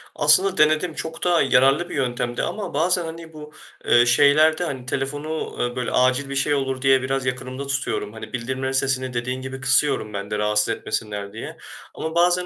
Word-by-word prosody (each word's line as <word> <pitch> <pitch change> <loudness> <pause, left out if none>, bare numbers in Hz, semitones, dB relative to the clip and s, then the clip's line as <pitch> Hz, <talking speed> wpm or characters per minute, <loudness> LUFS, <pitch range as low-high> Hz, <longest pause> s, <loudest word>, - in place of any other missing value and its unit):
Aslında 180 +6 +4
denedim, 155 +2 +3
çok 160 +1 -6
da 175 -2 +3
yararlı 135 +5 +3
bir - - -6
yöntemdi 120 -3 -2
ama 210 -8 -4
bazen, 175 +3 +1
hani, 165 0 -9
bu, 150 0 -11 0.3
eee, 120 0 +5
şeylerden, 145 +1 +3
telefonu, 145 +4 -4
eee, 120 0 -2
böyle 125 -1 -3
acil 130 +2 +2
bir 140 - -4
şey 145 +2 +1
olur 135 -2 -2
diye, 135 -1 +4
biraz 135 0 -2
yakınımda 130 +2 -4
tutuyorum. 130 -5 -1
Hani, 110 - -10
bildirimlerin 130 +2 -3
sesini 130 -1 0
dediğin 125 +2 -3
gibi 130 0 -7
kısıyorum 130 -4 +1
ben 100 +1 -6
de 105 - -1
rahatsız 105 +1 +1
etmesinler 105 -3 -4
diye 115 - -8 0.4
ama 160 +1 -5
bazen 180 +1 +3
135 Hz, 180 wpm, -22 LUFS, 125-155 Hz, 0.4 s, eee